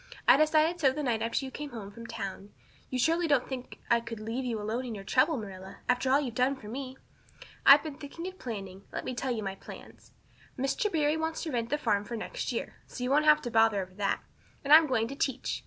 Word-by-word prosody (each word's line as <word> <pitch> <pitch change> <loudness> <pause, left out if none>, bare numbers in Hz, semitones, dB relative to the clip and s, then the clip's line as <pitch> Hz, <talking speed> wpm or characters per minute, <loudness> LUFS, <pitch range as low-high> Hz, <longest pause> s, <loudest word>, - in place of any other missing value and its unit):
I - - +9
decided 310 +3 +3
so 280 -4 +5
the 295 +3 -3
night 235 -4 0
after 230 +4 -1
you 265 - -7
came 295 +2 -6
home 215 -6 -8
from 230 +2 -10
town. 200 -2 -6 0.4
You 255 - -2
surely 330 +6 +2
don't 285 -5 +2
think 255 -2 -6
I 235 - +4
could 230 -1 -7
leave 225 +4 -3
you 230 -3 -2
alone 220 +4 -2
in 240 -3 -5
your 195 - -7
trouble, 255 - +2
Marilla, 190 -3 -8
after 250 +1 +1
all 275 +2 +5
you've 260 -6 -3
done 255 +4 +2
for 215 - -12
me. 260 +3 -6 0.7
I've 280 +1 +9
been 305 -3 -6
thinking 305 +4 -7
and 375 0 -7
planning. 195 -5 -7
Let - - -5
me 255 - -3
tell 260 +2 -3
you 225 -3 -2
my 195 -1 -3
plans. 195 - -13 0.5
Mr. 275 - 0
Barry 305 -1 +2
wants 320 0 -2
to 320 - -3
rent 235 -2 -1
the 295 - +1
farm 210 -8 +1
for 235 +3 -5
next - - -4
year. - - -4
So 250 - -7
you 250 - -1
won't 300 +2 +4
have 305 0 +6
any 240 - -3
bother 225 -2 +4
over 185 -1 -5
that. 200 +1 -1 0.4
And 285 +1 +4
I'm 315 0 +9
going 230 -4 +1
to 275 - -6
teach. 270 -2 -1
255 Hz, 245 wpm, -30 LUFS, 225-295 Hz, 0.7 s, I